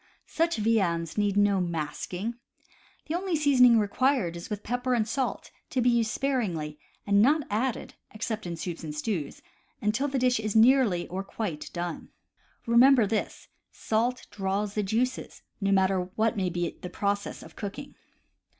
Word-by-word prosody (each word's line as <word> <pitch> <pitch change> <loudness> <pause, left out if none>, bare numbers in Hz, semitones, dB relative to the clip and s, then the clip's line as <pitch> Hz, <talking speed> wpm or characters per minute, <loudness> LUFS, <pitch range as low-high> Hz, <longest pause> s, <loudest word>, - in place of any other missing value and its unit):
Such 335 -2 0
viands 190 -7 +1
need 205 -1 +1
no 205 -1 +4
masking. 175 +5 -3 0.7
The 310 - -4
only 360 0 -1
seasoning 260 -6 +5
required 215 -3 +1
is 170 - -8
with 210 -1 -4
pepper 245 +2 0
and 220 -2 +1
salt, 260 +3 -2 0.2
to 260 - -1
be 245 0 +4
used 230 -2 +2
sparingly, 185 - -2 0.3
and 200 0 +4
not 295 +6 +4
added 230 +4 -1 0.2
(except 220 -2 -4
in 170 - -4
soups 170 0 -5
and 150 -2 -5
stews) 150 -2 -3 0.4
until 225 +7 0
the 275 -1 -2
dish 250 -2 +2
is 215 -1 -3
nearly 225 -6 +4
or 190 +2 -3
quite 195 -6 -5
done. 175 -1 -5 0.6
Remember 240 +1 +6
this: 215 +2 -3 0.2
salt 235 +3 -1
draws 200 +1 -2
the 210 - 0
juices, 235 +6 -2 0.2
no 195 0 +1
mat 190 -1 +4
ter 185 -2 0
what 220 0 +1
may 190 -3 0
be 175 -1 -3
the 180 - -6
process 200 +2 -2
of - - -14
cooking. 225 +8 -7
215 Hz, 160 wpm, -27 LUFS, 190-250 Hz, 0.7 s, Remember